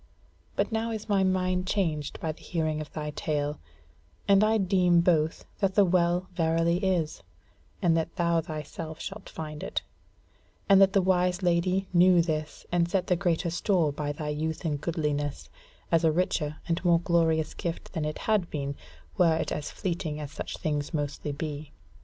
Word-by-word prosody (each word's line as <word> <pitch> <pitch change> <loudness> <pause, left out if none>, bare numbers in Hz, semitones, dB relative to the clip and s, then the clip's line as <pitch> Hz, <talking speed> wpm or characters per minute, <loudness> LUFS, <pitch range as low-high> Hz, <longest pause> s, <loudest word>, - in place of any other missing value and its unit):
But - - 0
now 225 +1 -1
is 220 -2 -5
my 200 -2 +3
mind 185 -1 +1
changed 160 -8 -1
by 160 - -2
the 155 - -14
hearing 155 -3 -1
of 150 - -8
thy 150 -1 -4
tale, 150 -1 -2 0.7
and 200 0 +6
I 220 +1 +3
deem 180 -3 +3
both 160 -2 +1
that 195 -2 +1
the 205 - +6
Well 175 0 +2
verily 165 0 +2
is, 175 -5 0 0.6
and 170 -2 +4
that 165 0 -1
thou 170 -2 +2
thyself 155 0 -6
shalt 205 0 -7
find 150 -1 -6
it; - - -3 0.8
and 195 -1 +7
that 195 0 +6
the 195 -3 +4
wise 180 0 +2
Lady 180 +2 +2
knew 175 -1 +6
this, 155 -2 -3
and 170 -1 +2
set 185 0 +1
the 180 - +2
greater 170 -1 0
store 170 -3 +1
by 145 0 -3
thy 150 0 -4
youth 155 +2 -3
and 145 -3 -1
goodliness, 150 -3 -2 0.4
as 165 0 +3
a 160 - +5
richer 155 -3 0
and 165 +1 -1
more 170 -2 +4
glorious 165 -3 +1
gift 170 -1 -5
than 160 - -2
it 150 0 -3
had 210 -5 +2
been, 140 -1 -3 0.4
were 170 -3 +5
it - - -2
as 150 - -3
fleeting 165 -4 -3
as 145 -2 -6
such - - -6
things 150 +1 -2
mostly 145 0 -2
be. 145 0 -5
170 Hz, 175 wpm, -28 LUFS, 155-185 Hz, 0.8 s, and